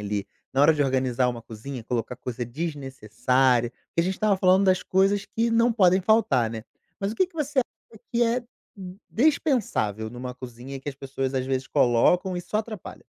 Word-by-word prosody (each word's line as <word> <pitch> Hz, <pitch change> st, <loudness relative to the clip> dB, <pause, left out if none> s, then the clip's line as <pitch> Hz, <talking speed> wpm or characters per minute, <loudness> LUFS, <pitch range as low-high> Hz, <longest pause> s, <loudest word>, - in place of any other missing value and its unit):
ali, 105 Hz, 0 st, -3 dB, 0.3 s
na 135 Hz, -, +3 dB
hora 160 Hz, -, +7 dB
de 150 Hz, -2 st, +1 dB
organizar 130 Hz, -2 st, +1 dB
uma 120 Hz, -2 st, -4 dB
cozinha, 115 Hz, +3 st, -8 dB
colocar 120 Hz, +1 st, -3 dB
coisa 125 Hz, -1 st, -5 dB
desnecessária? 130 Hz, -3 st, 0 dB
Porque 170 Hz, -, -4 dB
a -, -, +3 dB
gente 185 Hz, +2 st, -1 dB
estava 210 Hz, -1 st, +2 dB
falando 185 Hz, +1 st, +4 dB
das 185 Hz, -1 st, +3 dB
coisas 195 Hz, +1 st, +2 dB
que 230 Hz, +1 st, 0 dB
não 230 Hz, +1 st, +4 dB
podem 185 Hz, -3 st, +4 dB
faltar, 185 Hz, -, +3 dB
né. 110 Hz, -1 st, -6 dB, 0.3 s
Mas 200 Hz, +1 st, -2 dB
o -, -, -7 dB
que 375 Hz, -, +2 dB
que 360 Hz, -, -29 dB
você 295 Hz, -3 st, -2 dB
acha 260 Hz, -, -4 dB
que 240 Hz, -1 st, +2 dB
é, 235 Hz, +1 st, +2 dB
d 240 Hz, -, -21 dB, 0.6 s
dispensável 225 Hz, -, +1 dB
numa 125 Hz, +2 st, -7 dB
cozinha 125 Hz, +1 st, -9 dB
e 135 Hz, -, -9 dB
que 145 Hz, -, -7 dB
as 140 Hz, -, -4 dB
pessoas 135 Hz, -1 st, -4 dB
às 130 Hz, -1 st, 0 dB
vezes 135 Hz, 0 st, -1 dB
colocam 175 Hz, +10 st, +3 dB
e -, -, -2 dB
só 210 Hz, -, -4 dB
atrapalha? 215 Hz, -3 st, -7 dB
140 Hz, 200 wpm, -25 LUFS, 125-205 Hz, 0.6 s, hora